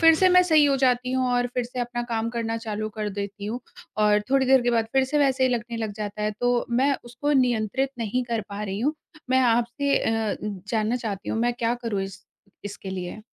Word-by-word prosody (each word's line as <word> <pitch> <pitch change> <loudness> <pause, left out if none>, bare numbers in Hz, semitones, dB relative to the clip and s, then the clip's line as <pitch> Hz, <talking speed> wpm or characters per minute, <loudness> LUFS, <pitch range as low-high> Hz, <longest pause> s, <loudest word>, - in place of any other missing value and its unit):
फिर 325 -1 +7
से 370 +3 +4
मैं 360 0 +6
सही 315 -4 +5
हो 280 -1 +3
जाती 255 -1 +2
हूँ 260 0 +1
और 245 0 +2
फिर 250 -1 0
से 250 +1 -5
अपना 240 0 -2
काम 230 -1 -1
करना 230 -1 -2
चालू 215 -1 -4
कर 215 -1 -2
देती 200 0 -5
हूँ 240 +4 -3 0.4
और 210 0 +4
थोड़ी 270 -1 +3
देर 265 -1 +6
के 245 - +2
बाद 230 -1 +1
फिर 265 0 +4
से 295 +3 0
वैसे 270 -2 +2
ही 255 - +4
लगने 235 0 -4
लग 220 -2 -3
जाता 210 0 -4
है, 210 - +1
तो 245 +3 0
मैं 270 +4 +3
उसको 250 +5 -2
नियंत्रित 250 0 +1
नहीं 230 +3 -1
कर 235 -2 -1
पा 200 +1 -5
रही 195 -1 -3
हूँ। 290 +6 +1 0.4
मैं 260 0 +4
आपसे 240 +3 +2
अ, 225 -2 0 0.3
जानना 220 +1 +1
चाहती 210 -5 -5
हूँ 225 - -1
मैं 240 +1 +2
क्या 235 0 0
करूँ 205 -4 -1
इस 195 +1 -8 0.4
इसके 200 -1 -7
लिए? 185 +2 -5
235 Hz, 230 wpm, -25 LUFS, 215-260 Hz, 0.4 s, फिर